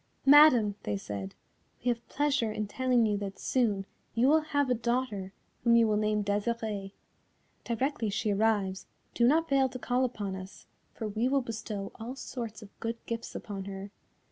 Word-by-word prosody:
"Madam," 275 Hz, -7 st, +7 dB
they 105 Hz, -1 st, -2 dB
said, 100 Hz, -1 st, -6 dB, 0.5 s
"we -, -, +3 dB
have 235 Hz, -1 st, -2 dB
pleasure 285 Hz, -6 st, +1 dB
in 215 Hz, 0 st, -2 dB
telling 250 Hz, +1 st, +2 dB
you 210 Hz, -1 st, +1 dB
that 195 Hz, -1 st, -5 dB
soon 210 Hz, -7 st, 0 dB, 0.3 s
you 235 Hz, +3 st, +4 dB
will 315 Hz, +2 st, +5 dB
have 285 Hz, -2 st, 0 dB
a 250 Hz, -, +3 dB
daughter 235 Hz, -5 st, -1 dB, 0.3 s
whom 235 Hz, -1 st, +5 dB
you 230 Hz, -1 st, +5 dB
will 215 Hz, -, +2 dB
name 210 Hz, 0 st, +1 dB
Desirée. 205 Hz, -1 st, -2 dB, 0.7 s
Directly 235 Hz, -1 st, -1 dB
she 215 Hz, +1 st, 0 dB
arrives, 200 Hz, -3 st, +1 dB, 0.3 s
do 235 Hz, -, +3 dB
not 325 Hz, +5 st, +3 dB
fail 270 Hz, -2 st, +3 dB
to 255 Hz, -, -6 dB
call 250 Hz, +1 st, 0 dB
upon 205 Hz, -6 st, -2 dB
us, 190 Hz, 0 st, -10 dB, 0.3 s
for 220 Hz, -, -5 dB
we 220 Hz, +4 st, 0 dB
will 275 Hz, -1 st, +2 dB
bestow 215 Hz, -3 st, -5 dB
all 235 Hz, +4 st, -5 dB
sorts 230 Hz, -5 st, -6 dB
of 200 Hz, -, -16 dB
good 230 Hz, +1 st, -3 dB
gifts 230 Hz, -1 st, -5 dB
upon 195 Hz, -2 st, -5 dB
her. 195 Hz, 0 st, -7 dB
225 Hz, 175 wpm, -30 LUFS, 205-255 Hz, 0.7 s, Madam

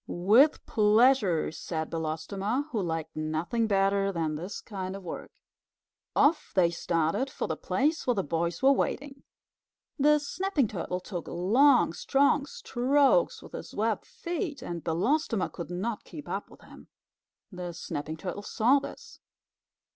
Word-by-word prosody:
"With 220 Hz, -, +4 dB
pleasure," 215 Hz, -5 st, +3 dB
said 160 Hz, 0 st, -4 dB
Belostoma, 195 Hz, -, -2 dB
who 220 Hz, -, -1 dB
liked 160 Hz, -2 st, -3 dB
nothing 160 Hz, +9 st, -1 dB
better 195 Hz, -1 st, +2 dB
than 165 Hz, -4 st, -1 dB
this 180 Hz, +7 st, -5 dB
kind 190 Hz, -3 st, -6 dB
of 195 Hz, -, -9 dB
work. 170 Hz, -, -7 dB, 0.9 s
Off 300 Hz, +2 st, +3 dB
they 175 Hz, -3 st, +4 dB
started 170 Hz, -, 0 dB
for -, -, -4 dB
the -, -, -2 dB
place 300 Hz, +3 st, 0 dB
where 245 Hz, -, +3 dB
the 195 Hz, -, 0 dB
boys 170 Hz, -, -2 dB
were 270 Hz, -, +7 dB
wading. 275 Hz, 0 st, -1 dB, 0.8 s
The 300 Hz, +2 st, +5 dB
Snapping 300 Hz, -, -1 dB
Turtle 180 Hz, -1 st, -4 dB
took 180 Hz, -2 st, -6 dB
long, 235 Hz, -, +4 dB
strong 280 Hz, -, +2 dB
strokes 290 Hz, -, +2 dB
with -, -, -12 dB
his -, -, -8 dB
webbed 220 Hz, 0 st, -1 dB
feet, 335 Hz, -6 st, -4 dB
and 170 Hz, -8 st, -5 dB
Belostoma 220 Hz, -, 0 dB
could 170 Hz, -, -7 dB
not 200 Hz, +6 st, -3 dB
keep 295 Hz, -, -10 dB
up -, -, -4 dB
with -, -, -17 dB
him. -, -, -15 dB, 0.6 s
The 180 Hz, -2 st, -5 dB
Snapping 155 Hz, -1 st, -5 dB
Turtle 185 Hz, +4 st, -5 dB
saw 240 Hz, +6 st, +3 dB
this. 460 Hz, -, -10 dB
205 Hz, 145 wpm, -28 LUFS, 170-275 Hz, 0.9 s, were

